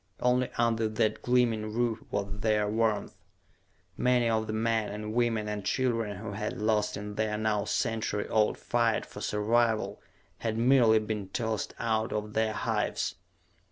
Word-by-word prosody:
Only 125 0 +2
under 115 -1 +2
that 110 0 0
gleaming 115 -4 +2
roof 120 -2 0
was 100 0 -3
there 105 -1 +2
warmth. 110 -1 0 0.8
Many 125 -1 +2
of 110 -1 +1
the 110 - -3
men, 110 -1 0
and 105 +1 -5
women, 115 -3 +1
and 105 -1 -3
children 115 -6 0
who 105 +1 -6
had 105 +1 -4
lost 105 -1 +1
in 105 0 -6
the 105 0 -1
now 105 -1 0
century 110 -2 -1
old 110 -1 +2
fight 115 -2 +1
for - - -10
survival 110 +1 +1 0.4
had 110 -1 -2
merely 120 -2 +5
been 105 -2 -3
tossed 110 0 -2
out 110 +1 0
of 105 0 -3
the 110 0 +1
hives. - - -1
110 Hz, 155 wpm, -29 LUFS, 105-115 Hz, 0.8 s, merely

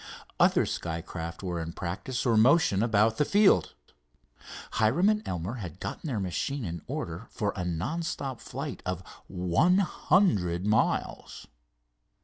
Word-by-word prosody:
Other - - +4
skycraft 85 +1 -5
were 90 -2 -2
in 80 0 -5
practice 95 +10 -4
or 115 -2 +3
motion 115 - +4
about 110 -1 +3
the - - +3
field. 200 +5 +3 1.0
Hiram 115 - +3
and 215 0 +1
Elmer 90 +7 -3
had 90 -5 -7
gotten - - -5
their 120 -7 -1
machine 110 +8 -2
in 85 -2 -5
order 85 +8 -5
for 100 -2 -2
a 90 - -3
non 90 - -2
stop 135 -6 -4
flight - - -6
of 90 0 -3 0.2
one 90 - +2
hundred 105 - +2
miles. 105 +1 0
105 Hz, 135 wpm, -28 LUFS, 90-135 Hz, 1.0 s, Other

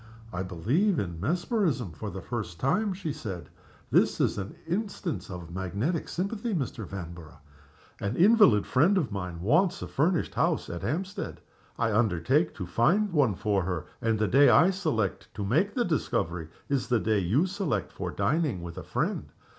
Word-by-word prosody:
"I 90 - -2
believe 120 - +1
in 85 -7 -3
mesmerism 165 - 0
for 75 - -6
the - - -7
first 85 -1 -5
time," 200 +11 +1
she 180 -5 -4
said. 95 -9 -6 0.4
"This - - +3
is - - +1
an 95 +1 -6
instance 185 - -3
of 85 -2 -8
magnetic 100 - -2
sympathy, 205 +4 -2
Mr. 125 - -3
Vanborough. 85 -4 -8 0.6
An 100 +4 -2
invalid 200 - +6
friend 170 +10 +3
of 155 -11 0
mine 90 -4 -4
wants 175 - +2
a - - -4
furnished 160 +4 +1
house - - 0
at 85 - -5
Hampstead. 190 +5 -3 0.4
I 115 -1 +1
undertake 110 - +2
to 90 - -5
find 175 - +2
one 135 - +3
for 100 0 +1
her, 90 -2 -3 0.2
and 115 -1 +1
the 105 0 +1
day 140 +5 +6
I 180 +4 +6
select 155 - -1
to 100 - -3
make 165 - +1
the 245 -2 +2
discovery 90 - -1 0.2
is 140 -2 0
the 120 -2 +2
day 110 -1 +1
you 105 - +2
select 185 - -2
for - - -4
dining 145 - 0
with 85 -1 -6
a - - -8
friend. - - -2
120 Hz, 170 wpm, -28 LUFS, -, 0.6 s, invalid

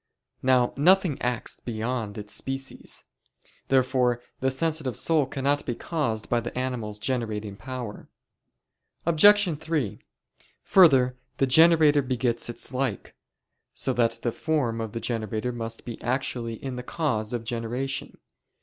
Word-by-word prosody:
Now 125 -1 +3
nothing 180 0 +4
acts 125 -1 -1
beyond 115 -2 -3
its 105 0 -4
species. 135 0 -4 0.6
Therefore 130 -2 +2 0.2
the 130 - +1
sensitive 140 -3 -1
soul 155 -5 +2
cannot 140 +2 0
be 120 - -3
caused 115 -10 -2
by 120 - +2
the 120 +1 -6
animal's 125 -5 -3
generating 110 -3 -2
power. 125 -2 -7 1.0
Obj. 175 0 +5
3: 150 -10 -2 0.6
Further, 135 -9 +5 0.2
the 135 - +3
generator 155 +1 +6
begets 125 -3 -1
its 120 - -6
like: 130 -6 -2 0.6
so 130 - 0
that 120 -2 +1
the 120 - +1
form 125 -6 -1
of 110 -2 -5
the 115 - -3
generator 110 0 -2
must 115 -1 -5
be 120 -2 -7
actually 120 -2 -2
in 130 +2 -6
the - - -3
cause 125 -6 -2
of 120 -2 -3
generation. 120 +3 -3
125 Hz, 130 wpm, -26 LUFS, 115-140 Hz, 1.0 s, generator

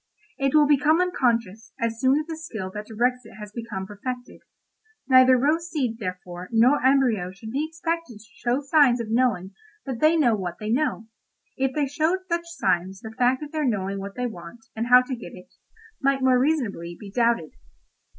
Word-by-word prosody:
It 275 +1 +1
will 300 -1 +6
become 295 +3 +3
unconscious 235 - 0
as 230 -1 -2
soon 260 +2 +3
as 305 - -4
the 325 0 -5
skill 220 -12 -6
that 210 +2 -7
directs 245 +3 0
it 225 - -14
has 210 -1 -9
become 215 -4 -6
perfected. 245 +5 -7 0.7
Neither 255 -1 +6
rose 315 +6 +1
seed, 250 -8 -2
therefore, 180 -2 -6
nor 245 +5 +4
embryo 255 -9 +3
should 220 +4 -10
be 280 +5 -1
expected 330 -6 -4
to 210 - -16
show 245 +3 -1
signs 280 -4 +4
of 225 -2 -4
knowing 220 -6 +1 0.3
that 260 -4 -4
they 310 +2 +4
know 245 -8 +3
what 180 -4 -5
they 215 0 -3
know—if 260 0 -3
they 295 -2 +1
showed 315 +7 0
such 340 -1 -2
signs 190 - -1
the 220 - -8
fact 255 +4 +2
of 295 - -8
their 310 -1 -2
knowing 200 -6 -1
what 195 0 -7
they 250 - -2
want, 220 +1 -9
and 225 +2 -2
how 250 0 +7
to 255 0 -4
get 235 - -10
it, 180 - -15 0.5
might 275 -1 +1
more 255 -1 +4
reasonably 230 - -1
be 200 -2 -10
doubted." 230 -8 +1
245 Hz, 190 wpm, -24 LUFS, 210-280 Hz, 0.7 s, how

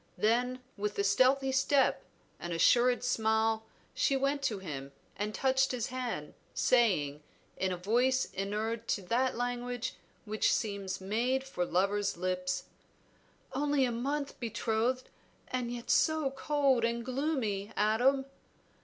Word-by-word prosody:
Then 245 +4 +1 0.2
with 210 0 -2
a 200 - +2
stealthy 260 +6 +3
step, 270 0 +2 0.4
an 175 - -5
assured 245 +9 +4
smile, 220 -2 +1 0.3
she 275 - +2
went 275 +1 0
to 220 -6 0
him 140 -7 -7 0.2
and 210 +1 -2
touched 265 +3 +2
his 250 -2 -2
hand, 245 -12 -4 0.2
saying, 165 - +2 0.3
in 190 0 -1
a 180 - -2
voice 245 +8 +2
inured 215 +4 -2
to 200 - -1
that 245 +6 0
language 245 0 -2 0.3
which 215 0 +1
seems 200 -3 -2
made 240 +7 0
for 270 -10 -2
lovers' 200 +3 0
lips 180 0 -1 0.9
"Only 285 0 +2
a 245 - -1
month 280 +4 -3
betrothed, 230 +2 -1 0.4
and 250 -2 -2
yet 240 -1 -3
so 315 -4 +3
cold 275 -3 +1
and 235 0 0
gloomy, 250 -7 -1
Adam!" 245 +6 +3
235 Hz, 130 wpm, -31 LUFS, 205-260 Hz, 0.9 s, assured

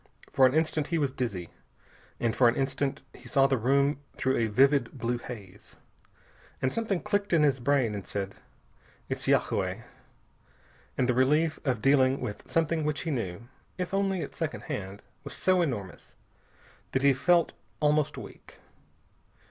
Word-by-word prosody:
For 130 -1 +6
an 130 - -1
instant 155 -1 +1
he 170 - 0
was 140 -4 0
dizzy, 100 -10 -4 0.7
and 115 -2 0
for 125 - +5
an - - -1
instant 135 0 -1
he 125 - -14
saw 135 +2 +4
the 135 0 +3
room 140 +4 +2 0.2
through 130 +1 +1
a 115 - +1
vivid 135 +6 +3
blue 120 0 -1
haze. 100 -6 -10 0.8
And 130 - 0
something 215 -6 -1
clicked 205 -2 -1
in 160 -3 +5
his 140 -3 +3
brain 130 -3 +2
and 100 -2 -6
said 100 -1 -4 0.8
"It's - - -3
yagué." - - +1 1.1
And 125 - +2
the 125 - +3
relief 150 +6 +2
of 125 -6 -1
dealing 135 -1 +4
with 110 -5 -6
something 165 -1 +1
which 150 0 -1
he 165 - -3
knew 95 -9 -3 0.4
if 180 0 -4
only 195 -2 0
at - - -8
second 160 -2 -3
hand 100 -9 -6 0.2
was - - -7
so 185 -1 +2
enormous 115 - -4 0.8
that 130 - +1
he 140 -1 +6
felt 170 +5 +3 0.3
almost 150 0 +2
weak. - - -11
135 Hz, 160 wpm, -28 LUFS, 120-155 Hz, 1.1 s, For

